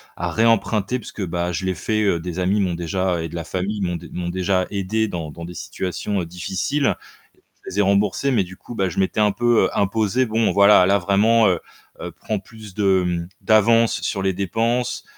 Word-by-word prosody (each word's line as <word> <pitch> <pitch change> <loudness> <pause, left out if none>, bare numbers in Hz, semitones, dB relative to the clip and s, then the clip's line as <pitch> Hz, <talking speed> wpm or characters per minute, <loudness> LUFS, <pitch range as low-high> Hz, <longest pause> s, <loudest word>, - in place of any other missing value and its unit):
à - - -3
réemprunter 115 0 +1
puisque 105 -4 -6
bah, 85 +1 -2
je 95 +3 -3
l'ai 95 - 0
fait, 110 -1 -1
heu, 85 -5 +1
des 90 +1 -5
amis 100 +3 +1
m'ont 90 -2 0
déjà 85 +1 -1
et 80 - -3
de 85 - -10
la 85 - -3
famille 95 +5 -3
m'ont 90 -2 -1
dé 85 - -11
m'ont 85 -1 -3
déjà 95 +1 0
aidé 105 +2 -1
dans 85 -4 -5
dans 85 +3 -9
des 90 +1 -7
situations, 95 +2 -3
heu, - - -4
difficiles. 95 - -1 0.7
Je - - -8
les 100 - -3
ai - - +6
remboursés, 100 +7 +1
mais 115 -8 +2
du 90 +1 -11
coup, 120 - -10
bah, 95 -3 0
je 85 - -4
m'étais 95 +2 0
un 105 -1 +4
peu, 120 +2 +2
heu, - - 0
imposé, 110 +5 +1
bon 110 +1 +1
voilà, 100 -2 +6
là 100 +2 +3
vraiment, 105 +4 +3
heu, 90 -3 +2 0.4
heu, - - -6
prends 110 - -4
plus 105 -1 -12
de, 95 -3 +2
mmh, 85 -1 -2
d'avance 115 +1 +3
sur 95 - -2
les 95 - +1
dépenses, 115 +6 -1
100 Hz, 220 wpm, -21 LUFS, 90-110 Hz, 0.7 s, ai